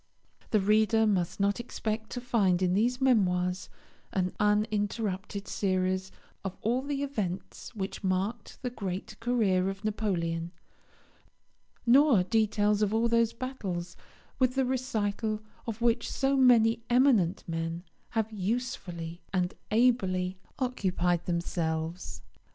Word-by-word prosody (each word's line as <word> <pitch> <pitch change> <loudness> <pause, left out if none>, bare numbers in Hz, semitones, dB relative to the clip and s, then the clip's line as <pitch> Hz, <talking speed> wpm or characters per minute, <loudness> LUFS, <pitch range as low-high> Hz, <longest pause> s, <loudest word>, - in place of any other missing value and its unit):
The 215 - +3
reader 215 +2 +3
must 190 -3 0
not 200 +3 +1
expect 220 -2 -3
to 245 - -5
find 195 -7 +2
in 180 -1 +2
these 240 +6 +2
Memoirs 185 -8 +2 0.4
an 185 -1 0
uninterrupted 210 -1 0
series 185 -1 0 0.3
of 195 -2 -5
all 240 +4 +1
the 280 0 -2
events 195 -11 -4
which 195 0 -4
marked 195 +5 -2
the 250 - -2
great 195 -2 -5
career 210 -6 +2
of 195 +2 -7
Napoleon; 175 -6 -1 1.3
nor 250 -4 +6
details 210 +1 +2
of 210 +1 +2
all 230 +1 +3
those 230 -1 +3
battles, 195 -9 -4 0.4
with 255 -1 +2
the 265 -1 +2
recital 220 -4 -1 0.3
of 230 +1 -4
which 235 0 +2
so 275 0 +1
many 235 -4 +5
eminent 240 -8 +3
men 165 +1 -3 0.3
have 220 0 +1
usefully 185 -6 -3
and 180 -2 0 0.2
ably 190 -6 +2 0.2
occupied 180 - 0
themselves. 170 -1 -2
210 Hz, 120 wpm, -29 LUFS, 185-235 Hz, 1.3 s, nor